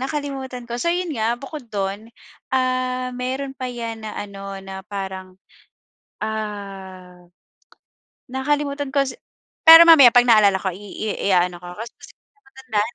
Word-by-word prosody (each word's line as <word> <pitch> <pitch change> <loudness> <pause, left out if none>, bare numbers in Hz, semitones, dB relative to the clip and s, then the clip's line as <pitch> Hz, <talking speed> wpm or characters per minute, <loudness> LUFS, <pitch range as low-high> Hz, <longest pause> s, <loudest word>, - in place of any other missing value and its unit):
nakalimutan 270 -3 -5
ko. 240 0 -4
So - - -3
yun 355 -1 -2
nga, 225 -1 0
bukod 280 -1 -8
dun, 200 +2 -3 0.5
ah, 255 0 -1
meron 260 +2 -4
pa 255 - -3
yan 230 -2 -6
na 215 - -6
ano, 195 -1 -7
na 190 0 -8
parang, 190 -2 -7 0.9
ah, 195 -4 -7 1.1
nakalimutan 285 +1 -2
ko 280 - +4
si 260 - -7 0.5
pero 325 +1 +12
mamaya 280 -8 +8
'pag 245 - +7
naalala 210 -5 +5
ko 190 - -1
i 180 - -10
i 205 +1 -7 0.2
ia-ano 180 -1 +2
ko 175 0 -11
kasi 225 +5 -8
hindi - - -15
ko - - -88
talaga 420 - -40
matandaan. 245 - -3
235 Hz, 155 wpm, -21 LUFS, 195-265 Hz, 1.1 s, pero